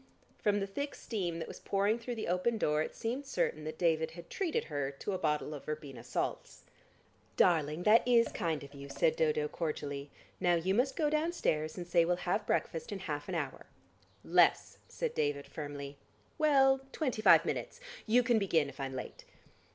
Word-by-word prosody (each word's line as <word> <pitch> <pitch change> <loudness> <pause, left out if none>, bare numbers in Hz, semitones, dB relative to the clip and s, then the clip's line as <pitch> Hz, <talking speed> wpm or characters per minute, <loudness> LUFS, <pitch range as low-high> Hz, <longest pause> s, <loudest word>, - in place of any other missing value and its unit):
From 205 -1 +2
the 195 - -1
thick 285 +9 -4
steam 180 -7 -3
that 165 - -5
was - - -9
pouring 200 +3 +1
through 240 +1 -5
the 220 - -4
open 185 +6 +1
door 150 -6 +1
it - - -4
seemed 255 +5 -3
certain 155 -10 -1
that 155 0 -5
David 160 -2 +2
had 170 0 -12
treated 365 -5 -1
her 145 -3 -2
to 140 +8 -5
a 185 - -2
bottle 150 0 0
of 145 - -8
verbena 145 -5 -6
salts. - - -4 0.7
"Darling, 160 -1 +3
that 215 +3 +6
is 235 -2 +5
kind 160 -4 -2
of 140 0 -12
you," 140 0 -9
said 140 +3 +2
Dodo 150 -2 +1
cordially. 145 -2 -4 0.3
"Now 175 -2 +3
you 175 +3 +1
must 250 +6 +1
go 310 - +1
downstairs, 305 - 0
and 175 - -4
say 175 -1 +4
we'll 175 +1 +2
have - - -1
breakfast 485 0 -1
in - - -3
half - - -5
an - - -2
hour." - - -4 0.6
"Less," - - +3
said 485 -2 -3
David 145 -1 -1
firmly. 145 -2 -7 0.4
"Well, 270 -3 +5
twenty 255 -8 -2
five - - +7
minutes. - - -3 0.3
You 245 +3 +5
can 235 -2 +3
begin 165 -7 +2
if 140 - -13
I'm 135 -1 -4
late." 130 - -7
175 Hz, 190 wpm, -32 LUFS, 150-230 Hz, 0.7 s, five